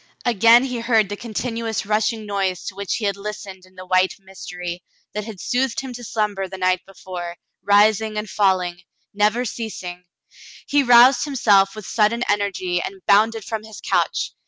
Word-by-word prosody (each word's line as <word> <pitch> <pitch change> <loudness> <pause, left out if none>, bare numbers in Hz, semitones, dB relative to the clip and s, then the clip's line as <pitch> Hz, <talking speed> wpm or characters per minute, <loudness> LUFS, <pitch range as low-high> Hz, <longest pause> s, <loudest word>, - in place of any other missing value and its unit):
Again 230 +1 +5
he 250 -3 -3
heard 225 -4 +2
the 205 - -3
continuous 230 0 -4
rushing 215 +1 0
noise 195 -3 -2
to 200 - -5
which 200 0 -3
he 220 - -3
had 200 -1 0
listened 200 -2 -8
in 185 - -24
the 185 0 -10
white 185 0 +2
mystery, 180 -2 -7 0.3
that 210 0 -4
had 215 -4 -9
soothed 250 +4 -1
him 265 -2 -7
to 245 0 -9
slumber 205 -3 -2
the 190 +1 -8
night 185 0 +1
before, 180 -2 -8 0.2
rising 215 +1 +3
and 210 0 -3
falling 185 -3 0 0.2
— - - -47
never 230 +4 +2
ceasing. 185 -6 -6 0.6
He 285 0 +2
roused 245 0 +6
himself 205 -9 +3
with 215 -2 -8
sudden 230 +2 +1
energy 185 -3 0
and 195 +1 -8
bounded 220 +1 +3
from 220 -1 -4
his 220 -1 -11
couch. - - 0
205 Hz, 175 wpm, -21 LUFS, 190-230 Hz, 0.6 s, roused